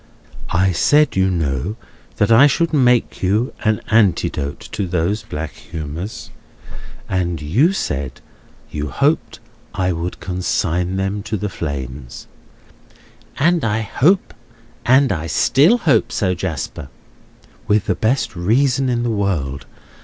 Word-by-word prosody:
"I 95 Hz, +2 st, +2 dB
said, 145 Hz, -, +3 dB
you 95 Hz, 0 st, +3 dB
know, 80 Hz, -, -1 dB, 0.4 s
that 105 Hz, +2 st, +1 dB
I 125 Hz, +6 st, +8 dB
should 170 Hz, +3 st, 0 dB
make 125 Hz, -5 st, +2 dB
you 105 Hz, +7 st, +1 dB
an 110 Hz, -1 st, +1 dB
antidote 90 Hz, -9 st, +1 dB
to 100 Hz, -3 st, -2 dB
those 90 Hz, +5 st, 0 dB
black 80 Hz, -8 st, -5 dB
humours; 80 Hz, -, -7 dB, 0.8 s
and 90 Hz, -2 st, -1 dB
you 110 Hz, -, +2 dB
said 70 Hz, -, -3 dB, 0.5 s
you 75 Hz, 0 st, -3 dB
hoped 145 Hz, +3 st, 0 dB, 0.4 s
I 90 Hz, -1 st, 0 dB
would 85 Hz, +1 st, -4 dB
consign 90 Hz, -1 st, -1 dB
them 95 Hz, +2 st, -2 dB
to 110 Hz, +1 st, -3 dB
the 105 Hz, +1 st, -3 dB
flames." 65 Hz, -6 st, -6 dB, 1.1 s
"And 170 Hz, +3 st, +2 dB
I 110 Hz, 0 st, 0 dB, 1.4 s
still 135 Hz, -, +4 dB
hope 120 Hz, -, +2 dB
so, 95 Hz, -4 st, 0 dB
Jasper." 80 Hz, -6 st, -5 dB, 0.8 s
"With 105 Hz, -1 st, +2 dB
the -, -, +1 dB
best 115 Hz, -1 st, 0 dB
reason 125 Hz, +8 st, +2 dB
in 120 Hz, -1 st, 0 dB
the 120 Hz, -, 0 dB
world! 75 Hz, -, -2 dB
95 Hz, 120 wpm, -19 LUFS, 85-115 Hz, 1.4 s, I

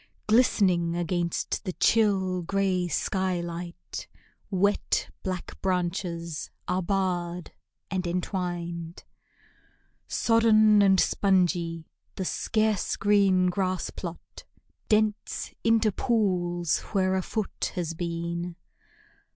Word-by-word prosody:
Glistening, 190 Hz, -7 st, +3 dB
against 175 Hz, 0 st, -1 dB
the 185 Hz, -3 st, -3 dB
chill, 190 Hz, -5 st, +2 dB
gray 185 Hz, 0 st, 0 dB
sky 185 Hz, +1 st, 0 dB
light, 170 Hz, 0 st, -6 dB, 0.4 s
Wet, 200 Hz, +1 st, +1 dB
black 185 Hz, -2 st, -5 dB
branches 175 Hz, -3 st, -2 dB, 0.2 s
are 180 Hz, +1 st, 0 dB
barred 180 Hz, -2 st, -1 dB, 0.4 s
and 185 Hz, -2 st, -1 dB
entwined. 175 Hz, -2 st, -3 dB, 1.0 s
Sodden 215 Hz, -2 st, +4 dB
and 195 Hz, -2 st, +5 dB
spongy, 175 Hz, -5 st, +1 dB, 0.3 s
the 190 Hz, -, -3 dB
scarce 215 Hz, +1 st, 0 dB
green 195 Hz, -3 st, +3 dB
grass 185 Hz, -1 st, -1 dB
plot 170 Hz, -2 st, -8 dB, 0.5 s
Dents 215 Hz, -1 st, 0 dB
into 225 Hz, -1 st, +3 dB
pools 180 Hz, -7 st, 0 dB
where 190 Hz, -2 st, +2 dB
a 190 Hz, -, +1 dB
foot 215 Hz, +2 st, -3 dB
has 170 Hz, -3 st, -2 dB
been. 170 Hz, +1 st, -3 dB
185 Hz, 95 wpm, -27 LUFS, 175-200 Hz, 1.0 s, and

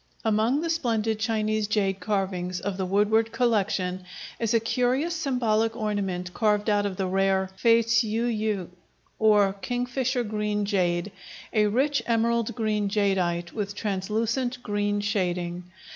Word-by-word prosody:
Among 220 Hz, +6 st, +2 dB
the 335 Hz, -, -2 dB
splendid 225 Hz, -8 st, 0 dB
Chinese 215 Hz, -1 st, 0 dB
jade 195 Hz, -3 st, 0 dB
carvings 185 Hz, -2 st, -2 dB
of 195 Hz, +2 st, -3 dB
the 190 Hz, -1 st, -2 dB
Woodward 215 Hz, +4 st, +2 dB
Collection 200 Hz, -6 st, 0 dB, 0.4 s
is 230 Hz, -2 st, 0 dB
a -, -, +5 dB
curious 255 Hz, +8 st, 0 dB
symbolic 230 Hz, -7 st, 0 dB
ornament 195 Hz, -5 st, -2 dB
carved 210 Hz, -1 st, +1 dB
out 205 Hz, 0 st, +2 dB
of 190 Hz, -2 st, -6 dB
the 190 Hz, -, -1 dB
rare 190 Hz, 0 st, +1 dB
fei 230 Hz, +3 st, +4 dB
ts'ui 230 Hz, +1 st, +1 dB
yü, 210 Hz, -4 st, -2 dB, 0.5 s
or 210 Hz, -3 st, +4 dB
"kingfisher 250 Hz, 0 st, -1 dB
green 210 Hz, -1 st, -1 dB
jade," 180 Hz, -2 st, 0 dB, 0.4 s
a 210 Hz, -2 st, +3 dB
rich 275 Hz, +7 st, +1 dB
emerald 235 Hz, 0 st, +1 dB
green 210 Hz, -2 st, 0 dB
jadeite 185 Hz, -4 st, 0 dB
with 205 Hz, -2 st, -3 dB
translucent 225 Hz, +5 st, -1 dB
green 205 Hz, 0 st, -1 dB
shading. 180 Hz, -3 st, -2 dB
210 Hz, 135 wpm, -26 LUFS, 195-230 Hz, 0.5 s, a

